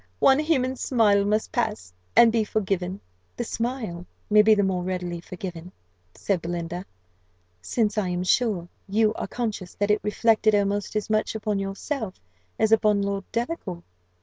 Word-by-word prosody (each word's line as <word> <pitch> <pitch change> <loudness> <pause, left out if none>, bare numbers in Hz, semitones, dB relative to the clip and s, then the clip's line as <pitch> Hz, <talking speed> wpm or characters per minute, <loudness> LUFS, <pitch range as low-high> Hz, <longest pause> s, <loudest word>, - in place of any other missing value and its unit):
One 270 - +5
human 265 -5 +1
smile 210 -6 +3
must 215 +1 0
pass, 215 - -2 0.2
and 235 -1 +7
be 225 -1 +2
forgiven." 195 -3 -2 0.4
"The 240 - -1
smile 230 -8 -4 0.2
may 210 0 +8
be 215 +1 +6
the 205 - +2
more 190 -2 0
readily 180 -2 -3
forgiven," 180 -1 -7 0.4
said 195 -4 -1
Belinda, 170 +2 -4 0.8
"since 215 - 0
I 190 -3 -1
am 180 0 -1
sure 190 -3 +1 0.2
you 215 +2 +3
are - - -4
conscious 215 -7 -4
that 205 0 +1
it 210 - +2
reflected 215 0 +3
almost 205 0 0
as 215 - -1
much 215 +1 +1
upon 210 -2 -1
yourself 195 +2 -4 0.4
as 220 - +2
upon 210 -2 +4
Lord 200 -1 -2
Delacour." 230 - -3
210 Hz, 155 wpm, -25 LUFS, 185-225 Hz, 0.8 s, may